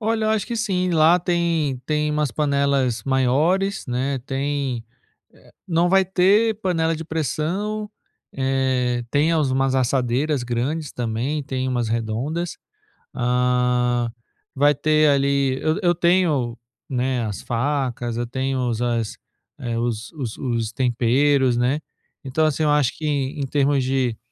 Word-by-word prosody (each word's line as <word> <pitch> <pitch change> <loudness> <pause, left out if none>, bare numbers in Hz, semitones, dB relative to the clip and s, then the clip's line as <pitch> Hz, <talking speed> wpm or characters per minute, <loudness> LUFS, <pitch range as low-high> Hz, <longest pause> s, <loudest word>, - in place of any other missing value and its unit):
Olha, 220 0 0
acho 220 -2 0
que 235 - -3
sim, 185 -5 0
lá 165 +1 +5
tem 170 -5 0
tem 150 0 0
umas 150 -2 0
panelas 140 -2 +1
maiores, 150 +10 +1
né. 130 +2 -1
Tem, 135 -3 -2 0.6
eh, - - -21
não 170 0 +2
vai 190 +1 +4
ter 195 +5 +3
panela 165 -4 +1
de 165 +1 -6
pressão, 170 - -2 0.4
eh, 130 -2 0
tem 150 +3 +2
é 165 - +2
umas 135 -3 +1
assadeiras 130 +2 +1
grandes 130 +6 -2
também, 125 +6 -2
tem 130 -1 -3
umas 120 -3 -1
redondas, 115 +10 -2 0.6
ah, 125 -1 +1 0.4
vai 145 +2 +4
ter 155 +2 +3
ali, 140 -1 +2
eu 155 0 +1
eu 175 -1 +3
tenho, 165 -9 +2 0.3
né, 125 -1 -1
as 105 -3 -5
facas, 120 -2 -2
eu 120 0 -2
tenho 130 0 -1
as 115 -1 -1 0.6
os 115 -1 -3
os 130 -9 -5
os 115 -3 -2
temperos, 130 +1 +2
né. 125 +5 +1 0.4
Então, 135 +4 0
assim, 155 +1 0
eu 150 - +3
acho 145 -4 +2
que 155 - -4
em 140 -1 -1
termos 140 0 +1
de 130 -3 0
135 Hz, 135 wpm, -22 LUFS, 125-160 Hz, 0.6 s, lá